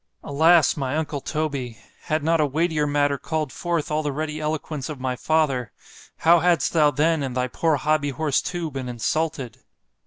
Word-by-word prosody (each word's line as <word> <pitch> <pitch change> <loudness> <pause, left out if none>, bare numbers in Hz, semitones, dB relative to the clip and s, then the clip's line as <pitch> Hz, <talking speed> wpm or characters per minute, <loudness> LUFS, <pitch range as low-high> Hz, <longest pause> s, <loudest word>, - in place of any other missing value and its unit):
Alas! 160 +2 +4
my 135 0 -2
uncle 150 -3 -3
Toby! 140 -6 -3 0.3
had 155 -2 -1
not 165 0 +2
a - - +3
weightier 155 +1 0
matter 145 -1 +1
called 155 -4 -3
forth 170 -2 -2
all 155 +1 +1
the 150 -1 -2
ready 155 +2 -4
eloquence 155 -2 -3
of 150 -3 -6
my 130 -1 -2
father—how 155 +3 0
hadst 175 0 +2
thou 155 -3 +5
then 155 +3 +1
and 130 -2 -3
thy 125 0 +1
poor 160 +5 +1
HOBBY 150 +1 +1
HORSE 140 +1 0
too 175 -3 -4
been 130 -2 -5
insulted! 135 +1 -2
150 Hz, 175 wpm, -23 LUFS, 135-160 Hz, 0.3 s, thou